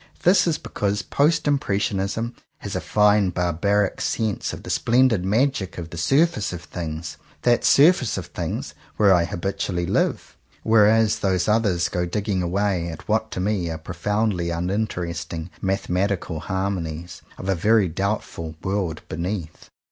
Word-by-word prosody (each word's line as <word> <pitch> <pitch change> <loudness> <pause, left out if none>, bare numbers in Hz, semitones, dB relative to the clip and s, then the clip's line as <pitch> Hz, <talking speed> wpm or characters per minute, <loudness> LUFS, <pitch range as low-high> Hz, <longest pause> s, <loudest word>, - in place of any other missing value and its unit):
This 180 0 +5
is 165 - +1
because 100 0 -2
Post 150 +2 +1
Impressionism 105 -3 0 0.2
has - - -6
a - - -1
fine 105 -2 +3
barbaric 90 +3 0
sense 110 -4 -1
of - - -8
the - - -5
splendid 120 -5 +3
magic 105 0 0
of 85 -1 -6
the 85 - -7
surface 135 - +2
of 90 -1 -7
things 80 -3 -6
— - - -30
that 120 -1 +3
surface 145 -4 +5
of - - -4
things - - -4 0.2
where 100 -3 +6
I 85 -2 +3
habitually 90 -1 -2
live; - - -1 0.3
whereas 110 0 +4
those 95 -2 +1
others 105 -5 +2
go 90 0 -2
digging 100 0 -1
away 90 0 0
at 80 - -9
what 110 +1 +1
to - - -4
me 95 -3 0
are 80 - -3
pro 80 +3 -8
foundly 105 -1 0
uninteresting 85 -2 -3
"Mathematical 95 -3 -1
Har 95 +5 -2
monies" 85 -2 -5 0.2
of 95 - -7
a 95 - +3
very 105 +3 +3
doubtful 85 -3 -3
''World 95 -5 -2
Be 80 - -6
neath." 85 -2 -5
95 Hz, 155 wpm, -23 LUFS, 85-110 Hz, 0.3 s, where